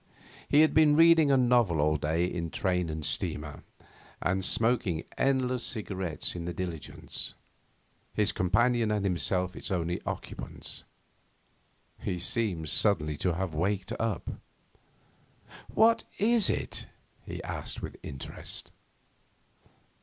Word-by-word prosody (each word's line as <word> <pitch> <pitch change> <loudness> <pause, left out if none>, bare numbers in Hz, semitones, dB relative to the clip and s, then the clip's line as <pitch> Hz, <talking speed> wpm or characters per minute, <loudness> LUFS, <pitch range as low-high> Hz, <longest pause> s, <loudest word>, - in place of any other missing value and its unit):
He 145 - +6
had 155 - +4
been 150 -1 +6
reading 165 -2 +6
a 135 - +5
novel 120 - +3
all 75 +1 +3
day 80 +4 +1
in 85 -2 -3
train 90 -1 0
and 80 -1 -3
steamer, 75 +1 -1 0.6
and 95 +1 0
smoking 110 -7 +1
endless 130 -2 +1
cigarettes 95 -7 -3
in 85 -1 -5
the 85 -1 -4
diligence, 85 -5 -5 0.8
his 105 -1 +1
companion 120 +5 +2
and 105 -2 0
himself 90 +1 0
its - - -6
only 85 -1 -1
occupants. - - -6 1.1
He 90 - -2
seemed 90 -4 -2
suddenly 75 -4 +3
to 90 +2 0
have 95 -2 -2
waked 95 +4 -1
up. 110 -6 -3 1.3
'What 230 +1 +4
is 225 0 +4
it?' - - -2 0.4
he - - -7
asked - - -5
with - - -5
interest. 70 0 -4
95 Hz, 120 wpm, -29 LUFS, 85-120 Hz, 1.3 s, He